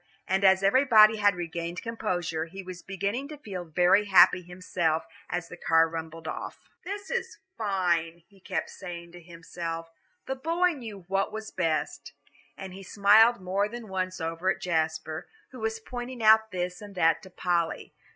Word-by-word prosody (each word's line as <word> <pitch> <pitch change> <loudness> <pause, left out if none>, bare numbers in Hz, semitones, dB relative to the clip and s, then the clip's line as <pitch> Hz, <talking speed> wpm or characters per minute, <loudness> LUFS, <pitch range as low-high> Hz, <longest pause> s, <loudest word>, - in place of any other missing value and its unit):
And 190 +1 +1
as 190 0 +5
everybody 220 -1 +6
had 205 -1 +3
regained 170 0 -5
composure, 180 -8 -2
he 190 +4 -9
was 180 -1 -8
beginning 200 +8 -3
to 300 0 -9
feel 190 -10 -7
very 180 +5 +3
happy 185 -2 +6
himself 175 -2 -2 0.2
as 175 -1 -3
the 175 - -10
car 165 -1 +4
rumbled 165 0 -7
off. - - -5 0.3
"This 395 +2 -6
is 475 - -3 0.2
fine," 175 -5 0
he 200 -2 -22
kept 180 -4 -3
saying 170 -2 -8
to 175 0 -12
himself, 165 -1 -7 0.3
"the 265 - -3
boy 335 +6 +1
knew 220 - -8
what 195 +2 0
was 220 0 -6
best," 155 -5 -2 0.4
and 190 -1 -8
he 195 - -9
smiled 215 +4 +5
more 195 +3 0
than 235 -1 -8
once 185 -1 -3
over 165 +3 -2
at - - 0
Jasper, 160 -1 -2 0.2
who 255 - -10
was 220 0 -2
pointing 245 +1 -6
out 220 0 +6
this 180 -1 -4
and 205 -1 -10
that 165 -3 +3
to 190 - -13
Polly. 175 -2 -1
185 Hz, 170 wpm, -28 LUFS, 170-215 Hz, 0.4 s, everybody